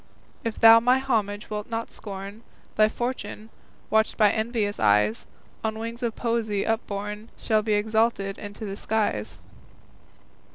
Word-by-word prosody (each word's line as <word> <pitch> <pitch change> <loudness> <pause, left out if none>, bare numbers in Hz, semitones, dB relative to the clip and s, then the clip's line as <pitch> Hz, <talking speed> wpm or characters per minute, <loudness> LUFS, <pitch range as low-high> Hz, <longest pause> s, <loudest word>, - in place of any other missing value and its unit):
If 230 -2 -3
thou 225 0 +9
my 250 +3 +4
homage 215 -6 -1
wilt 210 +1 -4
not 230 0 -3
scorn, 200 +1 -8 0.3
Thy 215 0 +5
fortune, 240 -2 -5 0.4
watched 220 0 +2
by 210 -2 +5
envious 220 -2 -1
eyes, 105 +1 +2 0.4
On 220 0 -1
wings 230 +2 -6
of 235 -3 -2
poesy 225 -4 -1
upborne 210 -1 -3
Shall 215 -2 +1
be 215 0 0
exalted 215 -1 +1 0.2
to 220 - -6
the 195 -1 -4
skies. 205 - -1
220 Hz, 135 wpm, -25 LUFS, 205-230 Hz, 0.4 s, thou